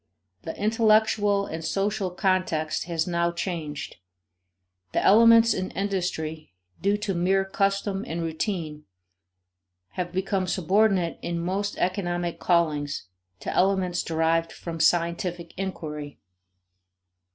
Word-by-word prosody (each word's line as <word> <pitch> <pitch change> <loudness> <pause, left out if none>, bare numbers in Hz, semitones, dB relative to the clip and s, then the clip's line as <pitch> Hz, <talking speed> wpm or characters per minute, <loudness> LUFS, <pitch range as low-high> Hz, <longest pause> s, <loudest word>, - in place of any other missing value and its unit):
The 160 - -6
intellectual 215 -2 +3
and 160 -2 -6
social 200 +2 -1
context 180 -5 0
has 165 -2 -1
now 170 -1 0
changed. 170 - -5 1.0
The - - +1
elements 230 +2 +7
in 185 -2 -3
industry 160 - -3 0.3
due 200 +3 +2
to 210 -1 -2
mere 190 +2 +2
custom 195 0 0
and 165 +1 -3
routine 160 -2 -3 1.0
have 175 - -4
become 190 0 -1
subordinate 190 -1 +2
in 170 0 -3
most 195 +4 -2
economic 175 -2 -1
callings 150 - 0 0.3
to - - -3
elements 185 -2 +2
derived 165 0 +1
from 165 -1 -7
scientific 170 +1 +1
inquiry. 150 -6 -5
180 Hz, 105 wpm, -26 LUFS, 165-195 Hz, 1.0 s, elements